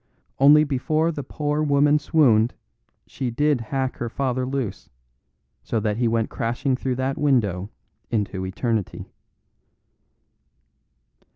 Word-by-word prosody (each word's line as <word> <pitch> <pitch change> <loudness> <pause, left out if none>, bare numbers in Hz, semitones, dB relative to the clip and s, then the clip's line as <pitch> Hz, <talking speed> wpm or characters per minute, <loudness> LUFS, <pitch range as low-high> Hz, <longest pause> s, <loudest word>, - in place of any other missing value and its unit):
Only 145 +3 +7
before 155 +3 0
the 150 - -5
poor 150 +2 -2
woman 145 0 +3
swooned, 125 -7 +3 0.5
she 130 - -4
did 145 +2 +1
hack 130 +3 -3
her 120 - -3
father 130 0 -2
loose, 130 -5 -4 0.7
so 115 - -2
that 105 0 -1
he 120 0 +1
went 115 -1 0
crashing 120 +3 -1
through 130 0 -2
that 130 +1 -2
window 105 -10 +1 0.4
into 100 -4 -2
eternity." 105 +2 -3
130 Hz, 115 wpm, -23 LUFS, 115-145 Hz, 0.7 s, Only